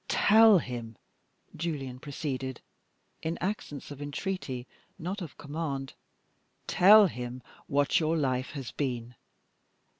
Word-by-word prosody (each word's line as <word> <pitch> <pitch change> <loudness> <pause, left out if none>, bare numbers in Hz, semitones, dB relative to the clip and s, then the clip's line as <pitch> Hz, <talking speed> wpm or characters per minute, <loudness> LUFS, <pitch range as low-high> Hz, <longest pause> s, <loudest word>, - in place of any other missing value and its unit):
"Tell 220 0 +6
him," 120 -7 -5 0.6
Julian 140 -6 -4
proceeded, 135 -3 -4 0.6
in 165 +1 -2
accents 180 -8 -4
of 145 0 -8
entreaty, 145 -4 -4 0.3
not 185 +5 -4
of 165 -6 -8
command 145 -3 -4 0.7
"tell 210 +3 +7
him 125 -6 -5 0.2
what 140 0 +2
your 160 0 +1
life 130 -3 0
has 135 -5 -6
been. 125 -4 -3
145 Hz, 110 wpm, -29 LUFS, 130-170 Hz, 0.7 s, tell